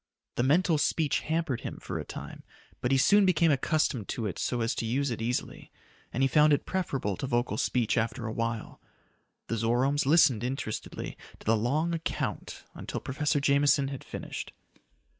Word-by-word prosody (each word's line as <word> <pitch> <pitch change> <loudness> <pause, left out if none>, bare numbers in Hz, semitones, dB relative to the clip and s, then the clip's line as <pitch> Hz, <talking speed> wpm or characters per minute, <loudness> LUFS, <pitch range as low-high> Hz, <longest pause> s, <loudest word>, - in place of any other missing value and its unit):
The - - -1
mental 155 +4 +3
speech 150 0 +1
hampered 160 -6 -1
him - - -6
for - - -5
a - - -4
time, - - -8 0.4
but 125 - 0
he 135 - +4
soon 205 +9 +5
became 170 -3 +4
accustomed 140 - +1
to 115 - -3
it 100 - -3
so 120 -1 -1
as 115 - +1
to - - -3
use 135 +3 0
it 115 - -4
easily, 120 +2 -3 0.4
and 130 - 0
he - - +5
found 150 +2 +5
it 145 - +1
preferable 135 - -1
to 135 - -3
vocal 120 -3 0
speech 115 0 +1
after 115 +1 -2
a 110 - -3
while. 115 -1 -3 0.6
The 115 - -2
Zoromes 125 +6 +1
listened 135 -7 +5
interestedly 125 -4 -4 0.2
to - - -17
the 115 - +4
long 145 +10 0
account 165 -1 -3
until - - -5
Professor 145 +2 0
Jameson 140 0 +3
had 135 -2 -6
finished. - - -6
135 Hz, 180 wpm, -29 LUFS, 115-150 Hz, 0.6 s, soon